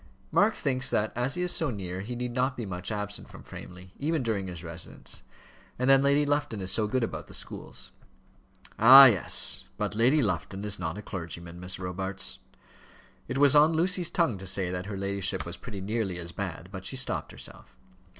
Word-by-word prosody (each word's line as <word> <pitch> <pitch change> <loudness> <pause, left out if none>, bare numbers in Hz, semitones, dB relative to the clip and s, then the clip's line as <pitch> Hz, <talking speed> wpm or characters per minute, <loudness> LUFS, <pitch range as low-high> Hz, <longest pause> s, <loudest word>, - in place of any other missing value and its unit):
"Mark 210 +1 +3
thinks 130 -2 0
that, 105 +1 0
as 125 +3 -1
he 180 - -1
is 180 - +2
so 160 -5 +1
near, 95 -5 -5
he 120 +5 -5
need 125 0 -3
not 130 +2 0
be 120 - -4
much 90 +1 -5
absent 105 -1 -5
from - - -12
Framley, 90 +1 -11
even 150 0 0
during 105 -5 -1
his 85 -2 -8
residence. 85 0 -6 0.6
And 125 - -1
then 135 0 +6
Lady 140 +1 +3
Lufton 145 -6 -1
is 95 -1 -2
so 110 -2 +1
good 125 +3 0
about - - -4
the - - -9
schools." - - -9 0.9
"Ah! 130 +5 +11
yes; 105 -9 +3
but 105 -1 -2
Lady 125 +8 +3
Lufton 95 0 -2
is 100 -3 -2
not 85 0 -3
a 105 - -7
clergyman, 85 -2 -7
Miss 90 +1 -3
Robarts." 95 +1 -3 0.9
It - - -3
was 145 0 +5
on 150 +2 +6
Lucy's 175 +1 +1
tongue 145 - 0
to 95 - -8
say 90 -1 +1
that 90 +1 -4
her 100 -2 -5
ladyship 100 -1 -1
was 85 - -6
pretty 105 -6 -8
nearly 100 -2 -2
as 85 -1 -6
bad, 90 -2 -6
but 95 -2 -7
she 115 - -3
stopped 130 - -1
herself. - - -11
105 Hz, 200 wpm, -28 LUFS, 95-130 Hz, 0.9 s, Ah